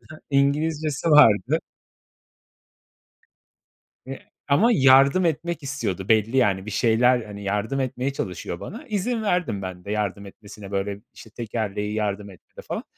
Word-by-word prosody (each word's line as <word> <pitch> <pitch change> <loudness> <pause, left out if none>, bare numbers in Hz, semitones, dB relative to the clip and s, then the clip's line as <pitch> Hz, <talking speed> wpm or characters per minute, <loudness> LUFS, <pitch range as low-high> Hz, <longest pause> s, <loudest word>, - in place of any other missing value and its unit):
hı. - - -16
İngilizcesi 150 +2 0
vardı. 145 +2 +5 2.5
Eee, 135 0 -8 0.3
ama 155 +13 +4
yardım 135 +3 +5
etmek 170 0 -2
istiyordu 115 -9 -4
belli, 110 +3 +2
yani, 100 -6 +2
bir - - -5
şeyler 120 +3 +3
Hani, 100 -1 -9
yardım 105 +7 -1
etmeye 130 +1 -2
çalışıyor 90 -6 -5
bana. 235 +10 -8
İzin 220 +3 -1
verdim 170 - -1
ben 90 -1 -7
de 100 - -7
yardım 100 -1 -2
etmesine. 100 0 -12
Böyle 100 0 -3
işte 110 - -13
tekerleği 105 -2 -4
yardım 100 -1 -3
etti 90 - -20
de - - -9
falan. - - -5
115 Hz, 140 wpm, -23 LUFS, 100-145 Hz, 2.5 s, vardı